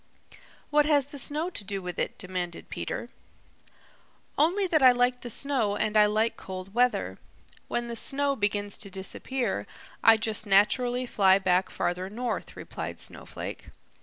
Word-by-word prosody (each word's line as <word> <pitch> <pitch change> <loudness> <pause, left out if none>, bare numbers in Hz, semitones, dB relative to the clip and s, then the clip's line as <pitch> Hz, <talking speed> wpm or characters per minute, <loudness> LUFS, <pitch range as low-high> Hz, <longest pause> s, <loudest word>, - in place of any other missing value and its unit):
"What 295 0 +4
has 290 -3 +3
the 285 0 -6
snow 310 +6 0
to 215 - -4
do 195 0 -4
with 180 -2 -6
it?" - - -2
demanded 180 -2 -5
Peter. - - -4 1.3
"Only 360 +7 +2
that 325 -5 +2
I 260 -1 +9
like 245 0 +1
the 240 - -6
snow 235 -5 +1
and 215 +1 -1
I 210 -1 +6
like 215 +2 0
cold 190 0 -8
weather. 250 +1 +1 0.5
When 240 0 -2
the 235 - -5
snow 280 +4 +2
begins 205 -2 -1
to 200 - -6
disappear, 195 - -3 0.4
I 225 0 +7
just 220 0 -2
naturally 245 +5 +3
fly 195 -5 +4
back 185 -1 +1
farther 180 +2 -2
north," 240 +4 -4
replied - - -6
Snowflake. - - -6
225 Hz, 155 wpm, -27 LUFS, 195-260 Hz, 1.3 s, I